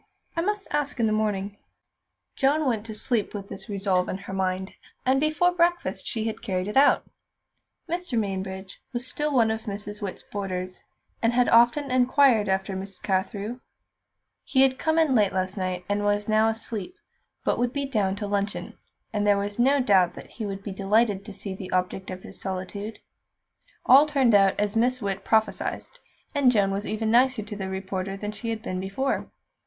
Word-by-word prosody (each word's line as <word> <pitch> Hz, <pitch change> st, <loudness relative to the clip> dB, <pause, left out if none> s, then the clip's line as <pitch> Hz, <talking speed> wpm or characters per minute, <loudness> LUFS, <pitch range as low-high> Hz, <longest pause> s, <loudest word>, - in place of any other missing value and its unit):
I 335 Hz, -, +1 dB
must 415 Hz, +2 st, -2 dB
ask 290 Hz, -2 st, -1 dB
in 230 Hz, -, +3 dB
the 215 Hz, -, +2 dB
morning." 205 Hz, -2 st, -1 dB, 0.8 s
Joan 295 Hz, +3 st, +2 dB
went 225 Hz, -4 st, -1 dB
to 220 Hz, -, -6 dB
sleep 220 Hz, -1 st, -1 dB
with 200 Hz, -1 st, -6 dB
this -, -, -9 dB
resolve 195 Hz, -2 st, 0 dB
in -, -, -2 dB
her 195 Hz, 0 st, -8 dB
mind, 190 Hz, 0 st, -1 dB, 0.3 s
and 265 Hz, +1 st, +3 dB
before 310 Hz, +4 st, +3 dB
breakfast 350 Hz, 0 st, 0 dB
she 225 Hz, -3 st, -1 dB
had 225 Hz, -, -3 dB
carried 185 Hz, -3 st, -2 dB
it 210 Hz, -, -4 dB
out. 275 Hz, +2 st, +5 dB, 0.8 s
Mr. 345 Hz, -7 st, -2 dB
Mainbridge 190 Hz, -2 st, -4 dB
was 240 Hz, +1 st, 0 dB
still 300 Hz, +4 st, -2 dB
one 230 Hz, -5 st, +3 dB
of 220 Hz, +1 st, -4 dB
Miss 205 Hz, 0 st, -6 dB
Witt's 200 Hz, -2 st, -5 dB
boarders, 185 Hz, -2 st, -5 dB, 0.4 s
and 230 Hz, +1 st, +2 dB
had 245 Hz, 0 st, +3 dB
often 240 Hz, +4 st, +4 dB
inquired 255 Hz, -4 st, +4 dB
after 190 Hz, 0 st, 0 dB
Miss 195 Hz, 0 st, -6 dB
Carthew. 200 Hz, +4 st, -2 dB, 0.8 s
He 265 Hz, -1 st, +3 dB
had 260 Hz, -1 st, +2 dB
come 315 Hz, 0 st, +1 dB
in 320 Hz, -4 st, +4 dB
late 210 Hz, -5 st, +3 dB
last 185 Hz, 0 st, -1 dB
night, 185 Hz, -2 st, -3 dB
was 205 Hz, 0 st, 0 dB
now 215 Hz, 0 st, +4 dB
asleep, 225 Hz, -, -4 dB, 0.5 s
but -, -, 0 dB
would 245 Hz, 0 st, +1 dB
be 280 Hz, +1 st, -2 dB
down 210 Hz, -8 st, 0 dB
to 205 Hz, +1 st, -4 dB
luncheon, 200 Hz, 0 st, -3 dB, 0.3 s
and 205 Hz, -1 st, 0 dB
there 205 Hz, -1 st, +5 dB
was 205 Hz, +2 st, -3 dB
no 275 Hz, +4 st, +4 dB
doubt 195 Hz, -8 st, +3 dB
that -, -, -11 dB
he 220 Hz, -3 st, -5 dB
would 195 Hz, 0 st, -5 dB
be 200 Hz, -, -5 dB
delighted 200 Hz, +1 st, +2 dB
to 210 Hz, -, -8 dB
see 195 Hz, 0 st, -6 dB
the 190 Hz, -1 st, -8 dB
object 185 Hz, +1 st, -1 dB
of 185 Hz, 0 st, -7 dB
his 195 Hz, -, -10 dB
solicitude. 195 Hz, +3 st, -5 dB, 0.8 s
All 275 Hz, +4 st, +8 dB
turned 270 Hz, -6 st, +3 dB
out 195 Hz, -1 st, +5 dB
as 205 Hz, 0 st, 0 dB
Miss 250 Hz, +3 st, +2 dB
Witt 195 Hz, -3 st, -3 dB
prophesied, 220 Hz, -1 st, +1 dB, 0.5 s
and 280 Hz, -4 st, +4 dB
Joan 200 Hz, -4 st, +2 dB
was 200 Hz, +2 st, -3 dB
even 220 Hz, 0 st, -1 dB
nicer 245 Hz, -1 st, +4 dB
to 210 Hz, 0 st, -7 dB
the 190 Hz, -2 st, -4 dB
reporter 190 Hz, 0 st, -4 dB
than 210 Hz, +1 st, -4 dB
she 230 Hz, +2 st, -6 dB
had 225 Hz, -1 st, -3 dB
been 185 Hz, -6 st, -3 dB
before. 200 Hz, +9 st, -2 dB
210 Hz, 190 wpm, -26 LUFS, 195-250 Hz, 0.8 s, All